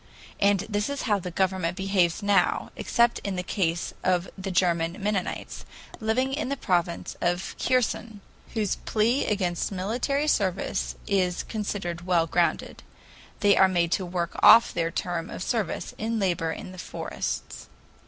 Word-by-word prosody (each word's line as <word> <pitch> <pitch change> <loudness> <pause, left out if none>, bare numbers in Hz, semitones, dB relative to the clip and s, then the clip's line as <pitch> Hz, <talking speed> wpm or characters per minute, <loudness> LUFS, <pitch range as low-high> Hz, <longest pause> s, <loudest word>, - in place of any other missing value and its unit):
And 200 -1 +3
this 210 +2 -2
is 280 -1 -3
how 210 -4 +2
the 180 - -5
government 185 -1 0
behaves 190 -1 +1
now, 200 -1 +2
except 235 0 +2
in 200 -2 -4
the 180 - -2
case 175 -3 -1
of 180 -1 +2
the 195 0 -5
German 170 -2 +1
Mennonites, 200 -2 -3 0.4
living 250 +5 0
in 280 -2 -2
the 280 - -2
province 175 -6 -1
of 175 +1 -1
Kherson, 235 -3 0 0.4
whose 210 -4 0
plea 230 +5 +1
against 185 -4 -1
military 245 +10 -1
service 195 - 0
is 185 -3 +1
considered 190 -5 -4
well 170 -3 +3
grounded. 170 +1 0 0.6
They 205 -1 +5
are 190 - +6
made 175 -2 +1
to 190 - +1
work 175 -1 -2
off 230 - +8
their 165 -1 0
term 170 0 -3
of - - -5
service 220 -5 -2
in 225 +1 -1
labor 175 -5 0
in 185 - -7
the 185 - -10
forests. - - -5
190 Hz, 155 wpm, -26 LUFS, 175-215 Hz, 0.6 s, off